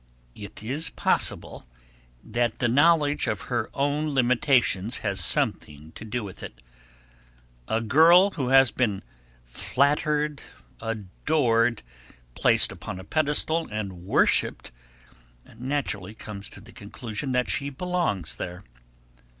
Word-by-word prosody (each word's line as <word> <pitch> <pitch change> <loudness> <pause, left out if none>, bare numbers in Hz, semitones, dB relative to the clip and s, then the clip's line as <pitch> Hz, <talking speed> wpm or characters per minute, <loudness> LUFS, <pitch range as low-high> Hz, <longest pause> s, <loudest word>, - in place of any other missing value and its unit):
It 100 +4 -10
is 140 +8 -2
possible - - -1 0.6
that 120 0 -1
the 120 - +1
knowledge 145 +3 +3
of 105 -3 -2
her 110 - -1
own 145 +1 0
limitations 125 -4 +2
has 100 -3 0
something 75 -1 -1
to - - -11
do 115 +2 -4
with 95 -2 -9
it. - - -9 1.1
A 110 - 0
girl 165 - +6
who 140 -8 -3
has 135 -2 +5
been 105 -6 -1 0.4
flattered, 150 - 0 0.4
adored, 115 - 0 0.5
placed - - +3
upon 90 - -7
a - - -9
pedestal 155 - 0
and 100 -5 -5
worshipped, 90 - +1 0.8
naturally 120 -6 -3
comes 105 -2 -9
to 100 - -12
the 115 +3 -15
conclusion 110 +5 -6
that 125 0 +1
she 140 - -2
belongs 170 - -2
there. 90 +1 -6
120 Hz, 120 wpm, -25 LUFS, 105-145 Hz, 1.1 s, girl